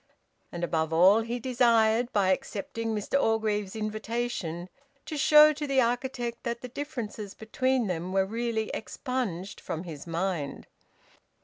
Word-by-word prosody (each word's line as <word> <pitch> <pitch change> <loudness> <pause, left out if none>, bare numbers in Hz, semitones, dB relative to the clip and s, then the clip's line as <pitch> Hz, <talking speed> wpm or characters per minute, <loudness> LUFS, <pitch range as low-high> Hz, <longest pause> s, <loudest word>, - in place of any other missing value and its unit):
And 175 0 -5
above 160 -2 0
all 185 +7 +6
he 235 +2 -3
desired, 235 -1 +3
by 200 -3 +2
accepting 230 0 -2
Mr 215 +7 0
Orgreave's 215 -4 0
invitation, 215 -5 -3 0.4
to 310 - -5
show 300 +1 +7
to 295 0 -4
the 275 -1 +2
architect 245 0 -1
that 235 0 -3
the 250 - -7
differences 230 -7 -6
between 255 +3 0
them 180 -1 -3
were 190 0 +2
really 225 +1 -2
expunged 220 -6 -4
from 160 - -4
his 160 -3 -8
mind. 165 -3 -2
225 Hz, 135 wpm, -28 LUFS, 190-245 Hz, 0.4 s, show